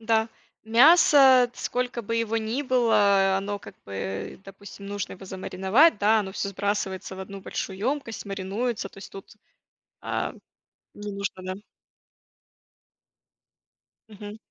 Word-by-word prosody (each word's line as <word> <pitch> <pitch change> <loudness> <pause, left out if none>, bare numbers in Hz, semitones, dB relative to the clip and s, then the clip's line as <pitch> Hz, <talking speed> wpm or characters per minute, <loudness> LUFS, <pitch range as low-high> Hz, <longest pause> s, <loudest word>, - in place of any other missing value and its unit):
да. 220 0 +1 0.4
Мясо, 265 0 +6
сколько 245 -1 -3
бы 230 +2 -2
его 225 -1 0
ни 225 +5 -2
было, 205 -7 +3
оно, 200 +1 -3
как - - -13
бы, 95 - -6
допустим, 200 0 -12
нужно 205 -1 -4
его 190 - -11
замариновать, 190 - +2
да, 215 +2 +4
оно 190 -2 -6
всё 200 - -3
сбрасывается 195 -1 -3
в 190 - -8
одну 195 +1 -8
большую 190 0 -5
емкость, 255 0 -3
маринуется, 200 +3 -3
то - - -22
есть 195 - -11
тут, 195 +2 -12 0.6
а, - - -3 0.6
не 205 0 -7
нужно, 200 -1 -5
да. 185 +1 -6 2.5
Мгм. 210 0 -10
205 Hz, 130 wpm, -25 LUFS, 195-230 Hz, 2.5 s, Мясо